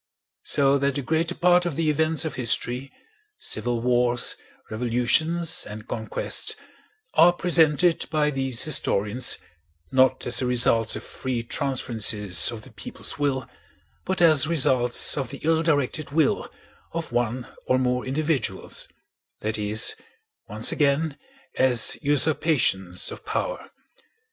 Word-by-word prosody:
So 140 0 +2
that 140 0 0
the 140 - -2
greater 165 +5 -1
part 180 0 +3
of 160 - -4
the 165 +1 -1
events 160 +2 0
of 160 - -3
history—civil 125 - -2
wars, 120 0 +1 0.4
revolutions, 125 +9 0
and 105 +1 -9
conquests—are 175 - -1
presented 170 -1 +2
by 150 -2 +1
these 135 -3 -1
historians 115 -5 0 0.5
not 130 0 +2
as 120 - +3
the 125 - -1
results 115 -2 +3
of - - -6
free 125 -3 -4
transferences 110 - +1
of 110 -2 -8
the - - -13
people's - - -4
will, 135 -3 -1 0.6
but 190 -1 -1
as 155 -4 +5
results 130 -6 +3
of 135 - -4
the 140 - -6
ill 160 +1 +2
directed 150 -2 -1
will 150 0 0 0.4
of 165 0 -4
one 120 +1 -1 0.2
or 130 - +3
more 125 -1 0
individuals, 145 -1 -2 0.5
that 110 0 -3
is, 105 +1 0 0.6
once - - +1
again, 145 +1 0 0.4
as 125 -3 +3
usurpations 140 - +1
of - - -10
power. - - -4
135 Hz, 125 wpm, -24 LUFS, 120-160 Hz, 0.6 s, as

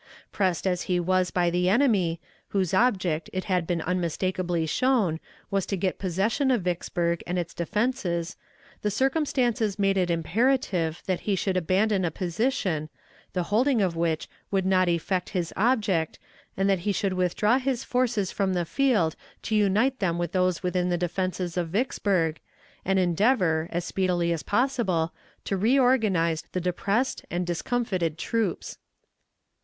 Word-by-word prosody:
Pressed 185 -3 0
as 180 -2 +1
he 180 -1 +2
was 185 +1 +1
by 175 -1 +1
the 180 +1 +2
enemy, 200 - +2 0.3
whose 190 -3 -1
object, 185 -7 +1
it 185 0 -2
had 180 -4 0
been 170 -3 -1
unmistakably 180 -1 -1
shown, 205 - +1 0.3
was 195 -2 0
to 195 - -1
get 185 0 -1
possession 200 - 0
of 245 -7 +2
Vicksburg 170 -1 -1
and 180 +1 -1
its 170 -2 -3
defenses, 180 -3 -1 0.5
the 210 - 0
circumstances 245 -4 0
made 195 -1 +2
it 180 -2 +1
imperative 175 -1 0
that 185 -2 -1
he 200 - +3
should 185 +1 -1
abandon 190 +3 +2
a 175 - +1
position, 175 - -1 0.4
the 180 - 0
holding 250 +2 +3
of 185 -4 +1
which 165 -1 -1 0.2
would 190 -2 0
not 185 -1 +3
effect 180 +2 -1
his 170 -2 -2
object, 205 -8 +1 0.4
and 195 +1 +2
that 195 -2 +2
he 205 +4 -1
should 195 0 0
withdraw 185 +7 +2
his 260 -2 -1
forces 240 -6 0
from 195 -2 0
the 175 -1 0
field 215 - +1 0.3
to 220 - -3
unite 215 +6 +2
them 170 -4 0
with 175 0 -2
those 185 -1 +1
within 180 0 0
the 175 - +1
defenses 180 0 -2
of 170 -2 -1
Vicksburg, 190 -6 0 0.4
and 190 +1 +1
endeavor, 180 -3 +2
as 175 0 -2
speedily 175 -3 0
as 165 - -3
possible, 205 -9 0 0.3
to 195 - -1
reorganize 215 - +2
the 185 - 0
depressed 195 +8 -1
and 175 +1 -2
discomfited 175 -2 -1
troops. 225 0 -2
185 Hz, 155 wpm, -26 LUFS, 175-215 Hz, 0.5 s, he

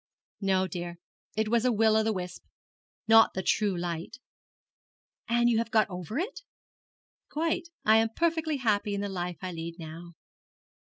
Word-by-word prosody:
'No, 190 -1 +2
dear, 175 -1 -5 0.4
it 220 0 +1
was 235 +1 +2
a 250 - +3
will 220 -1 +3
o' 220 - +5
the 220 0 +1
wisp, 180 -3 -5 0.6
not 225 0 +6
the 190 - -2
true 200 0 +1
light.' 170 -1 -4 1.1
'And 240 0 +3
you 230 -2 +3
have 230 -1 -2
got 220 -3 +3
over 180 - -5
it?' 400 +12 -3 0.9
'Quite. 330 +2 -1 0.2
I 220 +1 +6
am 225 0 +3
perfectly 320 -2 +1
happy 210 -4 +1
in 200 - -2
the 205 - -2
life 180 -2 -4
I 185 - -3
lead 165 0 -6
now.' 165 +1 -9
210 Hz, 165 wpm, -29 LUFS, 180-230 Hz, 1.1 s, not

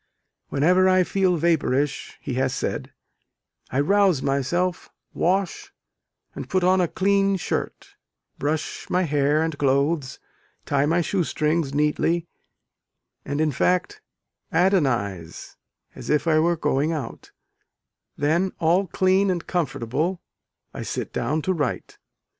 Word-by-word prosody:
"Whenever 180 +6 +3
I 185 0 +4
feel 185 -1 +1
vapourish," 145 -4 0
he 135 - -5
has 130 +1 0
said, - - -3 0.8
"I 130 - -1
rouse 190 -1 +3
myself, 165 +7 -1 0.2
wash, 190 +2 -1 0.6
and - - -7
put 185 -1 +1
on 185 +1 +4
a 175 - +2
clean 195 +2 +2
shirt; - - -4 0.5
brush 155 +2 -3
my 180 +1 +2
hair 150 0 +2
and 160 -1 -2
clothes, 140 +1 +1 0.5
tie 140 0 +1
my 170 +3 +2
shoe 180 +2 0
strings 155 -2 -1
neatly, 150 +3 +1 1.0
and 145 +1 -3
in 155 -1 +2
fact 180 - 0 0.5
adonize 125 - 0 0.4
as - - -9
if 150 +2 +2
I 155 -2 +3
were 170 +1 +2
going 145 +2 0
out: 150 -8 -6 0.9
then, 170 +6 +1
all 175 +4 +2
clean 190 +3 +2
and 175 -2 -2
comfortable, 160 +1 -2 0.5
I - - -6
sit - - -4
down 145 +6 -1
to 190 - +1
write." 145 -8 -3
160 Hz, 125 wpm, -23 LUFS, 145-185 Hz, 1.0 s, I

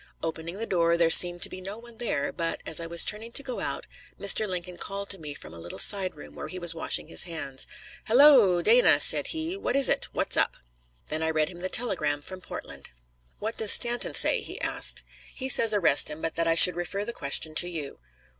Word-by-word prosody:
Opening 165 +2 -7
the 225 - -5
door, 170 -4 -1
there 165 -1 +1
seemed 175 0 +7
to - - +4
be 185 - -11
no 195 +3 -9
one 235 -1 -16
there, 185 -12 -3
but, 165 -1 -6
as 160 - -1
I 165 - -7
was 170 0 +3
turning 220 +2 -4
to 280 - -1
go 255 -3 -8
out, - - -5 0.3
Mr. 205 +2 +3
Lincoln 180 -1 -7
called 200 0 -7
to 195 - -1
me 150 -2 -9
from - - -13
a 85 - -12
little 85 +1 -9
side 195 -3 +4
room, 75 0 -15
where 75 - -10
he 185 - -10
was 175 -2 +3
washing 165 - -2
his - - +2
hands: 150 -6 -6 0.4
"Halloo, 235 -8 +4
Dana!" - - +3
said - - +5
he. 325 +2 -4
"What 395 - -5
is 275 -1 +6
it? - - +1
What's - - -3
up?" - - -1 0.5
Then 155 +1 -5
I 160 - -2
read 155 -1 -2
him 175 -1 -13
the 185 +1 -6
telegram 150 -12 -2
from 185 +3 -12
Portland. - - -11 0.5
"What 220 +2 -7
does 215 -2 +4
Stanton 240 0 +2
say?" - - +3
he - - -10
asked. - - -4 0.3
"He 260 - -6
says 230 -4 +5
arrest 190 -9 +2
him, 150 - -10
but 165 0 -5
that 165 0 -3
I 165 - +1
should 180 +1 +7
refer 195 +4 -6
the 235 - -6
question 150 0 -2
to 175 +3 -1
you." 155 -5 -8
180 Hz, 230 wpm, -24 LUFS, 165-220 Hz, 0.5 s, seemed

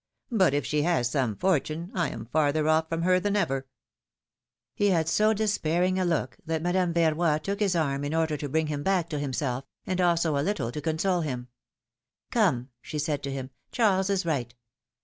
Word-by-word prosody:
But 185 - +3
if 145 - 0
she 150 0 +1
has 150 -7 +1
some 125 -7 0
fortune, 170 - 0
I 170 -6 0
am 115 - -7
farther 150 +4 +1
off 160 0 +2
from 165 0 -1
her 185 +1 +4
than 205 +2 -1
ever! 135 -9 0 0.5
" - - -66 0.3
He 205 - +1
had 165 -5 +2
so 215 +6 +3
despairing 185 -4 +1
a 185 - +1
look, 165 -7 -1
that 160 0 -2
Madame 175 0 +1
Verroy 165 -1 +2
took 200 0 -2
his 200 -4 +1
arm, 140 -4 0
in 145 +2 -2
order 160 -1 +1
to 145 0 -4
bring 160 +3 +1
him 150 -1 -3
back 180 0 +1
to 150 - -2
himself, 135 -2 -2 0.2
and 185 0 -1
also 170 -3 +2
a 140 - +1
little 165 - -1
to 150 - -5
console 170 +4 0
him. 125 -5 -4 0.8
^^Come!" 170 - +2
she 155 - -6
said 145 -1 -1
to 140 - -4
him, 135 -1 -5 0.2
Charles 200 -5 +2
is 195 -2 0
right. 125 -7 -2
160 Hz, 200 wpm, -27 LUFS, 145-185 Hz, 0.8 s, her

